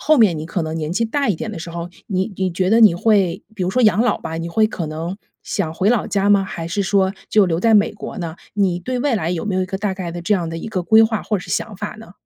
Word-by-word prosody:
后 310 0 +4
面 190 -8 +4
你 155 - -5
可 170 +1 -2
能 160 0 -3
年 155 0 -3
纪 230 +5 +1
大 280 +4 0
一 205 - +2
点 190 - -5
的 205 - -7
时 170 +1 -7
候， 170 0 -5 0.2
你 190 +1 -1
你 190 -2 -1
觉 185 +2 0
得 225 - +5
你 210 -6 +7
会 190 -1 +2
比 185 - -2
如 180 - 0
说 255 +6 +1
养 215 -1 +4
老 245 - +2
吧。 160 0 -5
你 165 +1 -4
会 215 +6 +2
可 170 -7 -4
能 165 +5 -5 0.3
想 165 -5 -3
回 190 +4 +1
老 240 -4 +1
家 200 0 0
吗？ 200 -1 +4
还 170 -3 -6
是 200 +4 -1
说 190 -1 +2 0.2
就 210 -2 +4
留 165 -2 0
在 225 +4 +3
美 205 - +4
国 215 - -8
呢？ 165 -1 -5 0.2
你 190 -4 +1
对 250 +8 -3
未 260 -4 +1
来 165 -2 -2
有 175 -2 -2
没 200 -3 -1
有 185 - +1
一 - - -3
个 190 - -4
大 200 -1 -1
概 180 -3 -5
的 175 - -5
这 210 - +2
样 175 -4 -1
的 165 - -5
一 190 - -6
个 185 -4 -2
规 220 +4 +6
划 220 -1 +1
或 210 - -1
者 - - -8
是 - - -10
想 215 - -2
法 210 +2 -5
呢？ 220 -5 -12
190 Hz, 335 characters per minute, -20 LUFS, 170-215 Hz, 0.3 s, 你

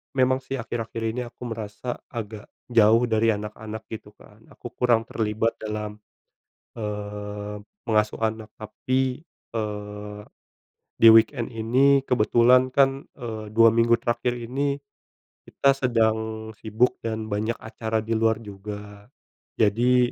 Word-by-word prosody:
memang 130 0 +3
sih 135 +1 -5
akhir-akhir 115 -1 -4
ini 125 - -3
aku 120 - -12
merasa 110 +2 -5
agak 110 -3 -7 0.2
jauh 115 +1 +5
dari 110 0 +3
anak-anak 105 +1 -6
gitu 105 -2 -8
kan 105 +2 -19
aku - - -9
kurang 115 -2 +2
terlibat 110 +1 -1
dalam, 105 -1 -5 0.8
eee, 105 -1 -5 0.3
mengasuh 110 -1 +1
anak 110 0 -2
tapi, 130 +5 -2 0.3
eee, 105 -1 -5 0.8
di-weekend 115 +2 +6
ini 130 +5 +3
kebetulan 125 +2 +4
kan, 135 0 +3
eee, 110 -4 -6
2 115 0 +7
minggu 115 +1 +3
terakhir 120 +1 0
ini, 140 +4 -1 0.7
kita 140 - +3
sedang 110 -3 0
sibuk 110 +3 +1
dan 110 -1 -3
banyak 110 +3 -1
acara 110 -1 -3
di 115 - -6
luar 110 0 +2
juga, 105 0 -9 0.5
jadi 120 +3 +3
110 Hz, 120 wpm, -25 LUFS, 105-120 Hz, 0.8 s, 2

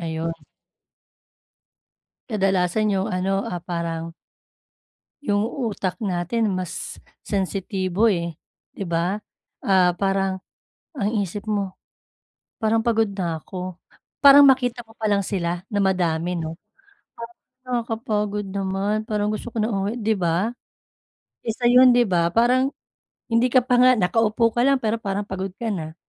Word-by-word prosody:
ayun. 165 0 -3 2.0
Kadalasan 195 0 +1
yung 190 +1 -1
ano, 195 +2 0
ah, 175 - -4
parang 165 -2 -4 1.1
Yung 205 -6 +1 0.2
utak 195 0 -3
natin 200 +3 0
mas 185 -1 -5 0.2
sensitibo 195 +1 0
eh, 170 -4 -1 0.4
'di 195 - -5
ba? 170 +4 0 0.4
Ah, 185 -2 +4
parang 195 0 0 0.5
ang 210 -9 -1
isip 205 +4 -7
mo, 200 -3 -1 0.9
parang 220 +1 +3
"Pagod 225 -2 +2
na 175 -5 -3
ko." 185 +1 -6 0.5
Parang 285 0 +9
makita 245 -3 +2
ko 225 - -19
pa 220 -2 -2
lang 200 -1 +2
sila 175 -3 -2
na 205 -2 -1
madami 175 -2 0
'no, 160 0 -4 0.6
parang, 235 0 -8 0.3
"Nakakapagod 220 -4 -2
naman 195 +2 -1
parang 210 -1 0
gusto 215 +3 -5
ko 230 - -5
na 220 +1 +1
umuwi," 200 +5 -2
'di 220 -1 +1
ba? 180 +5 0 0.9
Isa 240 +2 +1
yun 250 0 +7
'di 245 - +5
ba? 170 -1 +1
Parang 255 +4 +3 0.6
hindi 230 +2 +3
ka 255 -2 +5
pa 250 0 +2
nga 255 0 +7
nakaupo 225 +3 +2
ka 240 - 0
lang 275 0 +4
pero 225 0 0
parang 200 -1 -2
pagod 190 0 -4
ka 230 0 -3
na. 160 -4 -5
200 Hz, 135 wpm, -23 LUFS, 180-225 Hz, 2.0 s, Parang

